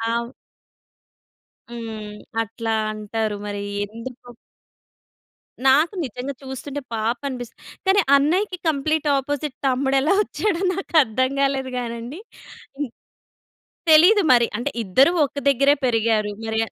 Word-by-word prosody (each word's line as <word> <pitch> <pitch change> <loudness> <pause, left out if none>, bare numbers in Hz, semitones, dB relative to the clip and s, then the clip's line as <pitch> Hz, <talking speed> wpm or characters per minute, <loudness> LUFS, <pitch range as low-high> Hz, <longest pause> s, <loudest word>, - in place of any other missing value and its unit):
ఆవ్ 235 0 -2 1.4
హ్మ్. 215 -3 -7 0.2
అట్లా 225 0 -3 0.2
అంటారు 215 0 -3
మరి 205 0 -4 0.2
ఎందుకో? 230 +4 -10 1.4
నాకు 300 +8 +5
నిజంగా 255 +3 -5
చూస్తుంటే 270 +2 -6
పాపం 230 +5 -2
అనిపిస్తది. 245 -2 -8 0.3
కానీ 395 +1 +5
అన్నయ్యకి 360 +7 +1
కంప్లీట్ 310 +1 0
ఆపోజిట్ 285 0 -3
తమ్ముడెలా 270 +5 +2
వచ్చాడో 395 -5 -2
నాకు 385 -3 -6
అర్థం 260 +4 0
కాలేదు 270 -1 0
గానండి. 240 +6 -5 0.6
హ్మ్. 290 -4 -3 1.0
తెలీదు 365 +7 +7
మరి. 235 -1 +4
అంటే 240 - -2
ఇద్దరు 260 - +4
ఒక 280 +1 -6
దగ్గరే 275 +2 +4
పెరిగారు 220 -3 +1
మరే 220 0 -2
260 Hz, 110 wpm, -22 LUFS, 225-290 Hz, 1.4 s, తెలీదు